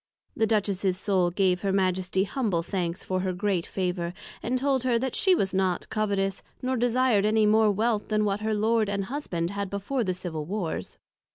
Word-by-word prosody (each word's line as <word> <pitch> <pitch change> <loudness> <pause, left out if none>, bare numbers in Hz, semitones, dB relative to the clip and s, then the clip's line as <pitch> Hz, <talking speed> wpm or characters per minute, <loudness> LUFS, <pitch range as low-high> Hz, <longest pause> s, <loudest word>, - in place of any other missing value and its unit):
The 220 - +2
Duchess's 200 -3 +1
Soul 190 -2 +2
gave 180 0 +1
her 195 - 0
Majesty 190 0 +1
humble 205 -7 -1
thanks 175 -1 -3
for 185 0 -1
her 185 0 -1
great 185 -2 -1
Favour; 180 -2 -2 0.3
and 250 +2 0
told 270 0 +1
her, 250 -2 +2
that 260 +1 -2
she 375 -1 +4
was 190 - 0
not 185 -2 0
covetous, 200 -3 -1 0.2
nor 260 +1 -1
desir'd 245 -3 +2
any 215 +1 +3
more 215 +1 +5
wealth 215 +1 0
than 215 -1 +1
what 200 0 0
her 215 0 -1
Lord 220 0 +2
and 200 -1 -1
Husband 185 - -3
had 200 -1 -3
before 200 +7 -2
the 185 -3 -1
Civil 165 -4 -5
Warrs. 185 -1 -4
200 Hz, 190 wpm, -27 LUFS, 185-220 Hz, 0.3 s, more